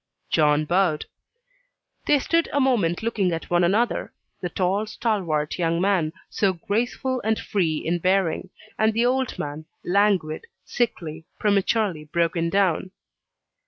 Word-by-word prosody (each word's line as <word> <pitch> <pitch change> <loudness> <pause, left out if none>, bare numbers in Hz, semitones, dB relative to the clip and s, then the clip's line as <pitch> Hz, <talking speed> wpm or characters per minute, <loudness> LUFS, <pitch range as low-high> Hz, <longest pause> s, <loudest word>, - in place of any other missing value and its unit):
John 150 0 +3
bowed. 175 -2 +1 1.0
They 295 - +5
stood 335 +4 +1
a 285 - +1
moment 220 -9 +2
looking 210 -5 +1
at 165 0 -5
one 175 0 +4
another; 210 +7 +1 0.3
the 180 - -2
tall, 190 +5 0
stalwart 180 -10 -1
young 165 -1 +1
man, 180 -4 +2 0.2
so 195 -2 +1
graceful 240 +7 -1
and 220 +1 +1
free 165 -6 0
in 170 +3 -1
bearing, 185 0 +1 0.3
and 220 0 +3
the 230 +1 +3
old 260 0 0
man, 150 +2 -5 0.2
languid, 185 -5 +1 0.2
sickly, 165 -9 -2
prematurely 200 -4 +1
broken 170 +1 0
down. 190 -1 +1
190 Hz, 130 wpm, -24 LUFS, 165-220 Hz, 1.0 s, They